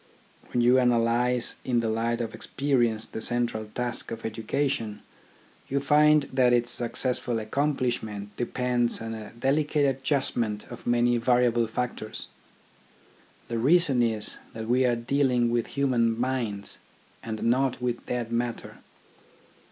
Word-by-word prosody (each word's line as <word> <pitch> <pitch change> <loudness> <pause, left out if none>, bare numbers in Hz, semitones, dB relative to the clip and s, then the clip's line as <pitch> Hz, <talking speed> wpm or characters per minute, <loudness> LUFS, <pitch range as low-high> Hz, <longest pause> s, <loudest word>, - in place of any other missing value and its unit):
When 120 - +1
you 125 +2 +5
analyse 120 0 +2
in 125 -2 +1
the 115 - -1
light 115 +2 0
of 115 -1 -4
experience 120 -6 0
the 110 - -7
central 120 -2 0
task 120 +3 -2
of 115 0 -6
education, 110 0 -2 0.6
you 140 - 0
find 150 +1 +5
that 125 -2 +4
its 120 0 +2
successful 120 0 0
accomplishment 110 -4 -2
depends 120 0 0
on 115 0 -5
a 110 -2 -7
delicate 145 +4 +1
adjustment 130 -5 -1
of 120 - -9
many 120 0 +3
variable 120 -1 +3
factors. 115 -1 -4 1.2
The 115 -1 -2
reason 145 0 +3
is 110 -3 0
that 110 0 -6
we 125 +2 +3
are 120 -1 +3
dealing 125 0 +1
with 120 -1 0
human 120 -5 +2
minds, 120 -6 -2 0.4
and 110 -1 -5
not 130 +2 +1
with 125 -1 -3
dead 120 -2 -3
matter. 120 0 -3
120 Hz, 130 wpm, -27 LUFS, 115-130 Hz, 1.2 s, you